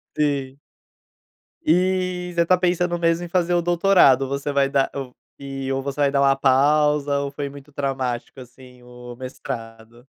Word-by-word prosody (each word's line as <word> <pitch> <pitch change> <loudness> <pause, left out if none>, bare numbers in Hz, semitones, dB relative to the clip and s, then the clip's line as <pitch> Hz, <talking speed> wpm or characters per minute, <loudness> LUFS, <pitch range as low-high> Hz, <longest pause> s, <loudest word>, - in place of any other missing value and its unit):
Sim. 140 -2 -1 1.1
E, 180 - 0
você 170 0 +3
tá 185 +2 +4
pensando 175 -1 0
mesmo 165 +1 +1
em - - -8
fazer 175 0 0
o 175 - +2
doutorado, 175 -6 +4
ou - - -3
você 140 +1 -3
vai 140 -1 +2
dar 135 -1 +1
um 135 -2 -5 0.3
e 135 -1 -5
ou 135 0 -2
você 140 +1 -4
vai 140 -1 +3
dar 140 -1 +1
uma 135 0 +4
pausa, 145 +2 +2
ou 140 0 -3
foi 140 0 -5
muito 140 +1 -13
traumático, 135 -3 -3
assim, 125 0 -15
o 125 0 -11
mestrado? 120 -2 -8
140 Hz, 170 wpm, -22 LUFS, 130-170 Hz, 1.1 s, tá